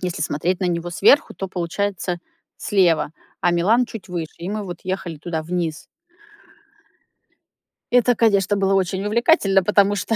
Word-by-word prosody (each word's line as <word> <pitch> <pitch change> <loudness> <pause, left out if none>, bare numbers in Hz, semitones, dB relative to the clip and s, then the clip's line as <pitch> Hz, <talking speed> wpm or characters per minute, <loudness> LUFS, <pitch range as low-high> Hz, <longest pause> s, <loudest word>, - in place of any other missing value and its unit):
Если 180 -4 -3
смотреть 170 +5 -1
на 185 - 0
него 170 0 -2
сверху, 280 - +3
то, 195 - -5
получается, 180 0 -3 0.4
слева, 180 -7 +2 0.3
а - - +2
Милан- 205 +9 +3
чуть 225 -4 -9
выше. 170 -3 -5
И 170 +2 -6
мы 210 +1 -3
вот 175 -3 -7
ехали 185 -3 -4
туда 160 0 -4
вниз. 170 -1 -3 2.0
Это, 245 0 +4
конечно, 205 -3 +2
было 195 -1 +1
очень 190 0 0
увлекательно, 210 - +3
потому 205 +1 +3
что 225 +2 -1
190 Hz, 150 wpm, -21 LUFS, 175-205 Hz, 2.0 s, Это